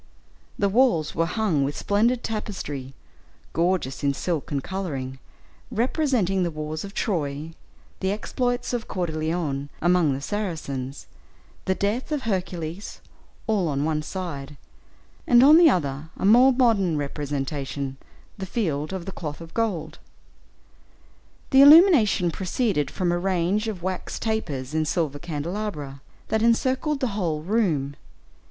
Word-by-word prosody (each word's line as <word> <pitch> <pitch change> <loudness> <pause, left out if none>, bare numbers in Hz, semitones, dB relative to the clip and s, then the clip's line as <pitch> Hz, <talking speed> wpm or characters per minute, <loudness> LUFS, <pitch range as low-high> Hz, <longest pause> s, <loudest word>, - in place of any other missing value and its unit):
The 200 - +2
walls 200 - +2
were 165 +1 +1
hung 185 -9 +1
with 140 +1 -2
splendid 230 +5 +1
tapestry, 150 -11 -5 0.6
gorgeous 170 -6 0
in 140 -1 +1
silk 165 -2 -2
and 140 -2 -1
coloring, 140 -9 -4 0.5
representing 235 - +1
the 175 - +1
wars 155 0 -5
of 200 0 -9
Troy, 155 -4 -2 0.5
the 190 0 0
exploits 245 +4 -2
of 240 -2 -2
Coeur 180 -2 -2
de 160 - -5
Lion 155 -3 -2
among 175 -4 +3
the - - -4
Saracens, 145 -9 -4 0.6
the 190 - +1
death 215 +10 -1
of 295 -3 -1
Hercules, 185 -3 -4 0.5
all 205 -6 +1
on 140 -2 -1
one 155 0 0
side; 150 -5 -6 0.7
and 245 0 +7
on 300 +3 +8
the 335 -1 +8
other, 150 - -1
a - - -2
more 245 +6 +7
modern 220 - +2
representation, 140 -1 -3 0.4
the 190 - -4
Field 160 -7 -2
of 185 -3 -5
the 195 - -5
Cloth 150 -5 -6
of 165 -1 -11
Gold. 175 -9 -2 1.5
The 270 - +7
illumination 285 - +7
proceeded 190 - -1
from 180 -2 -1
a 175 - 0
range 190 +3 0
of 195 -6 -5
wax 185 0 -3
tapers 155 - -3
in 160 0 +1
silver 155 -3 -1
candelabra, 155 -3 -4 0.3
that 220 - +1
encircled 260 +6 +1
the 255 - +1
whole 165 -7 -2
room. 165 -9 0
175 Hz, 140 wpm, -24 LUFS, 150-215 Hz, 1.5 s, on